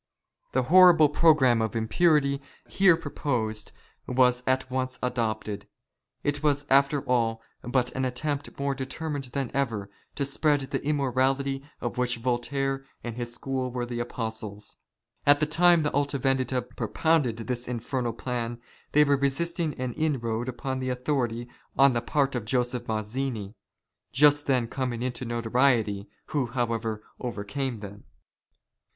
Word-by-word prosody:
The - - +2
horrible 175 -5 +7
programme 145 -7 +4
of 110 0 -2
impurity 140 +4 +2 0.3
here 190 -4 +4
proposed 115 -10 -3 0.4
was 125 -1 +3
at 130 0 +1
once 130 0 -2
adopted. 110 -4 -2 0.6
It 145 0 -1
was 145 -1 +1
after 140 +1 +4
all 115 -2 0 0.2
but 125 0 0
an 130 - -2
attempt 145 +3 -3
more 140 0 0
deter 135 +4 -5
mined 140 -2 -3
than 125 0 -3
ever, 115 -7 -1 0.2
to 140 - -1
spread 145 +1 +1
the 135 0 -3
immorality 135 -1 0 0.2
of 120 +1 -4
which 125 -1 0
Voltaire 135 +3 -1 0.2
and 120 -2 -5
his 120 -1 -4
school 130 +1 -2
were 125 -1 -3
the 120 0 -4
apostles. 110 -3 -5 0.5
At 145 0 +7
the 150 - +2
time 170 +2 +4
the 150 - -1
Aha 145 0 0
Vendita 130 -1 0
propounded 125 +2 0
this 120 +1 -4
infernal 120 0 -2
plan 120 0 -3 0.3
they 150 - +7
were 140 -1 +3
resisting 155 +3 -1
an 125 -1 -3
inroad 125 -6 -1
upon 130 +1 -3
their 130 -1 -1
authority 125 -3 -1 0.3
on 135 0 +6
the 120 - 0
part 140 +2 +1
of 120 -4 -3
Joseph 125 +1 -1
Mazzini, 110 -1 -3 0.6
just 145 +1 +4
then 125 -4 +2
coming 125 -1 -3
into 125 0 -3
notoriety, 115 -3 +1 0.2
who, 140 -5 0
however, 115 -3 -2 0.2
overcame 120 +1 -3
them. 100 0 -10
130 Hz, 145 wpm, -27 LUFS, 120-140 Hz, 0.6 s, horrible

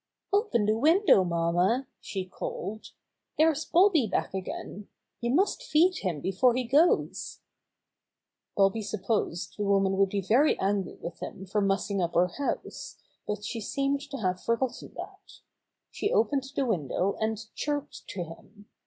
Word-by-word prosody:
"Open 400 - +2
the 215 +1 +2
window, 315 - +5
mamma," 175 +8 +1
she 190 -2 -4
called. 200 +3 -6 0.5
"There's 315 -1 +3
Bobby 345 - +4
back 190 - -1
again. 195 +1 -6 0.3
You 235 - -2
must 375 - +2
feed 365 -5 +3
him 170 -7 -2
before 230 - +2
he 255 - 0
goes." 290 +8 +2 1.2
Bobby 195 +2 +3
supposed 205 -4 -2
the - - 0
woman 195 -1 +2
would 195 0 +3
be 200 0 -1
very 245 +11 +3
angry 195 -1 -1
with 170 - -7
him 190 - -7
for 205 +2 0
mussing 195 0 0
up 170 -1 -2
her 180 +1 +4
house, 280 +10 -4 0.3
but 210 0 -3
she 230 +1 -4
seemed 275 +5 -1
to 275 - -5
have 185 -5 -1
forgotten 230 +2 -2
that. - - -10 0.5
She 415 - -2
opened 270 +4 +2
the 275 - +1
window 185 - 0
and 220 0 0 0.2
chirped 290 0 -4
to 180 - -4
him. 205 +5 -13
210 Hz, 150 wpm, -28 LUFS, 190-275 Hz, 1.2 s, window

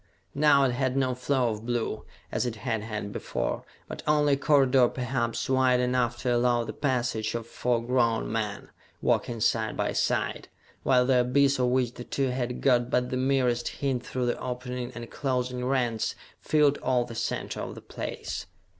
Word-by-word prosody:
Now 145 -1 +5
it 130 - +3
had 130 +1 0
no 130 -2 +2
floor 125 -1 +1
of 110 0 -6
blue, 115 -2 -2 0.3
as 125 - 0
it 115 - -3
had 115 -1 -2
had 105 -2 -5
before, 65 +1 -3 0.2
but - - -7
only 150 -1 +4
a - - +5
corridor 135 -3 +4
perhaps 120 -2 -2
wide 130 -1 +3
enough 125 -1 +1
to 125 -2 +2
allow 120 0 +2
the 110 - -6
passage 120 -5 -1
of 115 -1 -3
four 120 0 -1
grown 120 -3 +1
men, 105 -2 -3 0.3
walking 120 -1 0
side 110 0 +1
by - - 0
side, - - 0 0.3
while 125 -1 +4
the 130 -1 +4
abyss 135 +2 +3
of 125 - +3
which 125 -1 +1
the 120 - -8
two 135 +1 -1
had 125 -1 -3
got 125 -2 +3
but 125 0 0
the - - 0
merest 130 -2 +1
hint 130 -3 -2
through 125 -1 -2
the 120 - -1
opening 125 0 -4
and 120 -1 -8
closing 125 -2 -2
rents 125 -4 0 0.2
filled 150 -2 +3
all 125 -2 +1
the 120 - -9
center 115 - -3
of - - -5
the - - -8
place! - - -5
125 Hz, 180 wpm, -27 LUFS, 120-130 Hz, 0.3 s, Now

